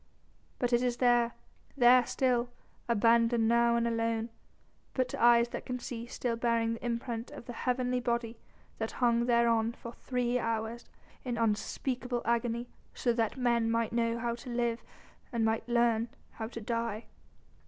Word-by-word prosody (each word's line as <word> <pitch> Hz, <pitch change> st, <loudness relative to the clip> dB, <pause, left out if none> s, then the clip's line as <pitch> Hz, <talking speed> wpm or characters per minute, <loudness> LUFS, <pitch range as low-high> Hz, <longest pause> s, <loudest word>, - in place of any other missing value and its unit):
But 245 Hz, -1 st, -1 dB
it 240 Hz, -, +4 dB
is 245 Hz, -1 st, 0 dB
there 240 Hz, -1 st, +3 dB, 0.4 s
there 250 Hz, 0 st, +7 dB
still, 245 Hz, -2 st, +1 dB, 0.4 s
abandoned 230 Hz, 0 st, +3 dB
now 235 Hz, 0 st, +4 dB
and 235 Hz, 0 st, +1 dB
alone, 230 Hz, 0 st, -1 dB, 0.6 s
but 255 Hz, -1 st, +1 dB
to -, -, -5 dB
eyes 235 Hz, 0 st, +6 dB
that -, -, -5 dB
can 250 Hz, -, -2 dB
see, 240 Hz, -1 st, -6 dB
still 240 Hz, -1 st, -2 dB
bearing 230 Hz, -1 st, +1 dB
the 230 Hz, -, -8 dB
imprint 235 Hz, -1 st, -3 dB
of -, -, -10 dB
the 245 Hz, -, -7 dB
heavenly 250 Hz, +1 st, 0 dB
body 235 Hz, -1 st, -2 dB, 0.4 s
that 220 Hz, 0 st, -3 dB
hung 235 Hz, -1 st, +2 dB
thereon 235 Hz, -1 st, +3 dB
for 235 Hz, 0 st, -9 dB
three 250 Hz, -1 st, -1 dB
hours 230 Hz, 0 st, -3 dB, 0.3 s
in 245 Hz, -2 st, -3 dB
unspeakable 240 Hz, +3 st, -1 dB
agony 235 Hz, 0 st, 0 dB, 0.3 s
so 240 Hz, -, +1 dB
that 230 Hz, +1 st, -1 dB
men 235 Hz, -2 st, +2 dB
might 230 Hz, 0 st, 0 dB
know 230 Hz, 0 st, +1 dB
how 235 Hz, 0 st, -1 dB
to 235 Hz, +2 st, -9 dB
live 235 Hz, -1 st, -1 dB, 0.5 s
and 230 Hz, -2 st, +1 dB
might 225 Hz, +2 st, -1 dB
learn 235 Hz, -1 st, +2 dB, 0.2 s
how 220 Hz, -, -5 dB
to 230 Hz, 0 st, -7 dB
die." 230 Hz, 0 st, -2 dB
235 Hz, 160 wpm, -31 LUFS, 230-245 Hz, 0.6 s, there